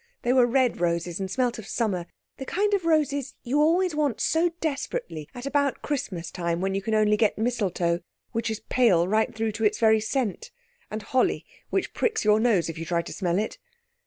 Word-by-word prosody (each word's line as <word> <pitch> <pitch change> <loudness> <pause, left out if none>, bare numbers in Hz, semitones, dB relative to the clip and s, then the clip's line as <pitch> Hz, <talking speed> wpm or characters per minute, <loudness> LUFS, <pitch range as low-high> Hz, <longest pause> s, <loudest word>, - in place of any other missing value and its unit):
They 245 - +2
were 250 -2 +5
red 250 -5 +1
roses 170 0 0
and 190 -1 -3
smelt 245 +2 0
of 215 - -9
summer—the 210 +4 -4
kind 410 +3 +1
of 385 -4 +1
roses 285 -4 +1
you 265 +4 0
always 345 +3 +3
want 295 -5 0
so 330 +2 +2
desperately 175 - -3
at 245 +1 -7
about 285 -1 0
Christmas 205 - -3
time 170 -1 -2
when 195 +1 -1
you 195 - -1
can 220 +3 -1
only 210 0 +4
get 210 0 +2
mistletoe, 195 -7 0 0.3
which 225 -1 -1
is 220 -1 -4
pale 195 -9 +3
right 215 +3 +2
through 220 0 -1
to 220 +2 -4
its 210 0 +3
very 220 -1 +4
scent, 245 - -2 0.4
and 215 0 -5
holly 255 +5 +1 0.2
which - - -1
pricks 445 - 0
your 210 0 +5
nose 220 -7 +2
if 165 -1 -6
you 165 - -4
try 170 0 0
to - - -7
smell 180 -3 0
it. 215 +2 -2
220 Hz, 200 wpm, -26 LUFS, 190-270 Hz, 0.4 s, were